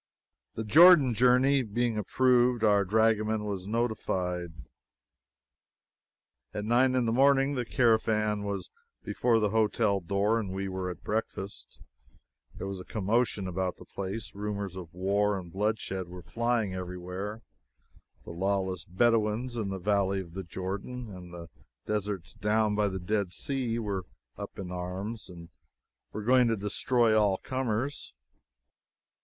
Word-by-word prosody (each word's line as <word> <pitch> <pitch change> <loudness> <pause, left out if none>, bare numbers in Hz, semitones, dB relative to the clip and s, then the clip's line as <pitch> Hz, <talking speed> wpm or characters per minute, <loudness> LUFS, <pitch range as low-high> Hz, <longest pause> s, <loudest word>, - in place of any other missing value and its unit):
The 110 - -3
Jordan 150 - +7
journey 125 +4 +4
being 120 0 -1
approved, 125 +2 +2
our 100 -2 +4
dragoman 110 +1 +2
was 100 -2 -4
notified. 95 -6 -1 2.0
At 105 0 -3
nine 125 +3 +3
in 125 -2 +2
the 115 - +1
morning 135 +2 +4
the 125 -3 -2
caravan 110 -3 +2
was 100 -1 -4 0.3
before 115 -2 +1
the 105 -2 +1
hotel 110 -2 +2
door 100 +5 +1
and 105 -4 -4
we 95 0 -3
were 95 -1 -3
at 90 - -8
breakfast. 105 -2 -4 0.8
There - - -6
was 95 -1 -5
a - - -7
commotion 110 -1 0
about 90 0 -2
the - - -13
place. 100 +3 -5
Rumors 100 -2 -4
of 90 -3 -8
war 100 +3 +1
and 90 -3 -8
bloodshed 100 -2 -2
were 90 0 -10
flying 115 -3 -1
every 90 -1 -5
where. 95 +5 -6 0.8
The - - -9
lawless 95 0 -1
Bedouins 115 +4 +1
in 110 -4 -2
the 95 - -3
Valley 100 0 +1
of 85 -3 -8
the 95 - -4
Jordan 100 +5 -6
and 90 -1 -11
the 85 -1 -9 0.4
deserts 105 -4 -3
down 105 +1 +1
by 105 0 +2
the 95 -1 -3
Dead 100 +1 -1
Sea 125 +3 -2
were 100 -5 -3 0.3
up - - -8
in 90 -2 -6
arms, 95 +5 -5
and 85 -2 -11 0.6
were 105 - -5
going 125 +2 +5
to 115 -1 +1
destroy 110 +3 +2
all 105 -3 +3
comers. 130 - -3
105 Hz, 145 wpm, -29 LUFS, 95-115 Hz, 2.0 s, Jordan